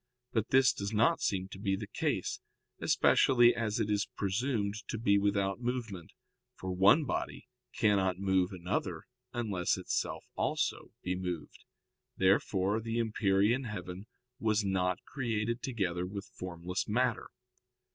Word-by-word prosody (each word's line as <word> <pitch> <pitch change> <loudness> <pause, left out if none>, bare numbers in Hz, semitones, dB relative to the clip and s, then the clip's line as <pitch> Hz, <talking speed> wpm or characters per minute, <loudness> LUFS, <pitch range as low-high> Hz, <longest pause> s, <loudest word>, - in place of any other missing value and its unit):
But 110 -4 0
this 135 -1 +5
does 100 -3 -4
not 110 +2 +3
seem 95 -1 0
to 95 - -9
be 100 -1 0
the 105 +2 -5
case, - - -2 0.4
especially 120 -2 +5
as 110 -2 -1
it - - +1
is 105 0 +1
presumed 100 +1 0
to - - -3
be 100 -2 +3
without 100 +1 0
movement; 115 -8 -4 0.4
for 95 - -5
one 100 - +5
body - - -3 0.3
cannot 95 -4 +3
move 95 -2 +2
another 90 -2 -3 0.3
unless 105 -8 0
itself - - -2
also - - -1
be 90 - -1
moved. 90 -3 -5 0.5
Therefore 95 +2 +2
the 115 +1 -3
empyrean 110 +2 +2
heaven 100 -3 -6 0.3
was 110 -1 +1
not 90 -2 0
created 115 -2 -2
together 90 -8 -2
with 100 +1 -7
formless 90 0 -4
matter. 120 +2 0
100 Hz, 135 wpm, -32 LUFS, 95-115 Hz, 0.5 s, this